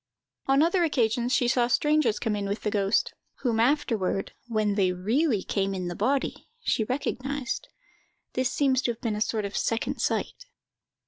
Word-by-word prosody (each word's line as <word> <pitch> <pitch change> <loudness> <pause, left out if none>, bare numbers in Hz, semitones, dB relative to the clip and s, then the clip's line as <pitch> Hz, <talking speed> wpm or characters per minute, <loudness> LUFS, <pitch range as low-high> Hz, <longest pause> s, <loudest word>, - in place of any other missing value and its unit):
On 270 +2 +5
other 345 +2 +3
occasions 245 -5 +1
she 255 -3 +3
saw 240 -1 +3
strangers 295 -1 +2
come 220 -3 -1
in 200 -1 -2
with 200 +2 -3
the 210 - 0
ghost, 200 0 +1 0.3
whom 235 -4 +1
afterward, 230 -7 +1
when 215 -3 +1
they 195 -3 +2
really 215 - +1
came 195 -1 -1
in 180 -1 -3
the 175 - -5
body, 260 +7 -1 0.2
she 220 - +1
recognised. 265 +2 -3 0.7
This 255 0 +1
seems 270 -2 +2
to 245 - 0
have 225 - -20
been 225 -4 -1
a 210 - -4
sort 215 -1 0
of 200 - -5
second 230 0 -1
sight. - - -2
235 Hz, 175 wpm, -27 LUFS, 210-270 Hz, 0.7 s, On